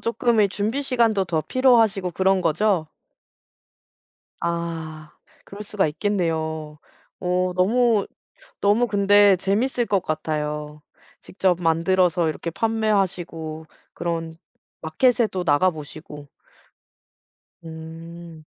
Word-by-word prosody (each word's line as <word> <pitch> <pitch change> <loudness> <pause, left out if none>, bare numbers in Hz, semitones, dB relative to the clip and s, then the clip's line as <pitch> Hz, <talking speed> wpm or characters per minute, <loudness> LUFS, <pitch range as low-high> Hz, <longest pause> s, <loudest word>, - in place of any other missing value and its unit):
쪼끔의 230 -3 +1
준비 220 +8 -2
시간도 230 -7 +2
더 165 -3 -1
필요하시고 225 - +2
그런 190 +1 +1
거죠? 170 0 +1 1.5
아. 165 -2 -4 0.3
그럴 200 +1 -9
수가 205 -3 0
있겠네요. 160 -4 -2 0.4
어 180 0 0
너무 225 +2 +2 0.5
너무 210 +4 +3
근데 205 -1 +5
재밌을 230 +6 0
것 195 -3 +1
같아요. 150 -1 -4 0.4
직접 185 -2 -1
만들어서 170 0 +2
이렇게 170 +2 -4
판매하시고 180 -7 -1 0.3
그런 165 -1 -4 0.4
마켓에도 215 +2 +1
나가보시고. 150 -2 -1 1.4
음. 165 0 -10
180 Hz, 215 characters per minute, -23 LUFS, 160-205 Hz, 1.5 s, 근데